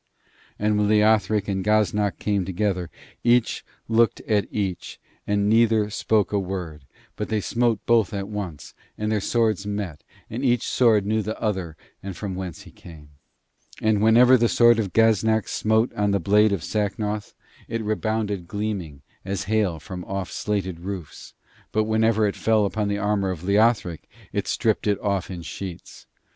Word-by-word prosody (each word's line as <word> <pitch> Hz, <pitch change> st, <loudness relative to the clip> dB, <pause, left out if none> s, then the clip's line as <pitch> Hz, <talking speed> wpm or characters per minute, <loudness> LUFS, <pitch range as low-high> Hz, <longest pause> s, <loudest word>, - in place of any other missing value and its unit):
And 105 Hz, 0 st, +1 dB
when 105 Hz, -, +2 dB
Leothric 105 Hz, -1 st, +3 dB
and 95 Hz, -1 st, -1 dB
Gaznak 105 Hz, -1 st, +1 dB
came 100 Hz, -2 st, 0 dB
together, 95 Hz, -1 st, -2 dB, 0.3 s
each 120 Hz, 0 st, +2 dB, 0.2 s
looked 115 Hz, 0 st, +3 dB
at 105 Hz, -2 st, 0 dB
each, 95 Hz, -4 st, -4 dB, 0.3 s
and 105 Hz, 0 st, +1 dB
neither 110 Hz, -1 st, +3 dB
spoke 105 Hz, -1 st, +1 dB
a 100 Hz, -, +2 dB
word; 90 Hz, -6 st, -5 dB, 0.3 s
but 105 Hz, -, -4 dB
they 110 Hz, -1 st, 0 dB
smote 115 Hz, 0 st, 0 dB
both 115 Hz, -3 st, +3 dB
at 100 Hz, -2 st, -4 dB
once, 100 Hz, -8 st, -6 dB, 0.2 s
and 105 Hz, 0 st, -2 dB
their 105 Hz, -2 st, +1 dB
swords 110 Hz, -3 st, 0 dB
met, 100 Hz, -7 st, -4 dB, 0.2 s
and 120 Hz, +5 st, -5 dB
each 120 Hz, -3 st, +1 dB
sword 110 Hz, -5 st, +3 dB
knew 110 Hz, +1 st, +1 dB
the 110 Hz, +1 st, -5 dB
other 95 Hz, -7 st, -2 dB, 0.2 s
and 95 Hz, -2 st, -7 dB
from 100 Hz, -3 st, -4 dB
whence 90 Hz, -3 st, -6 dB
he -, -, -14 dB
came. 75 Hz, -4 st, -14 dB, 0.7 s
And 110 Hz, -2 st, +2 dB
whenever 120 Hz, +4 st, +6 dB
the 115 Hz, -1 st, +2 dB
sword 120 Hz, -1 st, +5 dB
of 100 Hz, -4 st, -2 dB
Gaznak 110 Hz, -1 st, +3 dB
smote 110 Hz, +2 st, +1 dB
on 105 Hz, 0 st, 0 dB
the 100 Hz, 0 st, +1 dB
blade 105 Hz, +2 st, +4 dB
of 95 Hz, -5 st, -2 dB
Sacnoth 105 Hz, 0 st, -2 dB, 0.3 s
it 115 Hz, -1 st, -3 dB
rebounded 105 Hz, -3 st, -2 dB
gleaming, 95 Hz, -9 st, -4 dB, 0.2 s
as 95 Hz, 0 st, -3 dB
hail 100 Hz, -5 st, 0 dB
from 90 Hz, +3 st, -7 dB
off 95 Hz, -2 st, -4 dB
slated 95 Hz, -5 st, -2 dB
roofs; 90 Hz, -3 st, -8 dB, 0.4 s
but 110 Hz, -, +2 dB
whenever 110 Hz, 0 st, +2 dB
it 100 Hz, -, -1 dB
fell 110 Hz, -2 st, +2 dB
upon 105 Hz, +1 st, -1 dB
the 100 Hz, 0 st, -1 dB
armour 100 Hz, -1 st, 0 dB
of 90 Hz, -3 st, -5 dB
Leothric, 100 Hz, -3 st, +1 dB, 0.2 s
it -, -, -2 dB
stripped -, -, 0 dB
it 100 Hz, -1 st, +1 dB
off 100 Hz, -3 st, -1 dB
in 90 Hz, -3 st, -6 dB
sheets. 90 Hz, 0 st, -8 dB
105 Hz, 165 wpm, -24 LUFS, 95-110 Hz, 0.7 s, whenever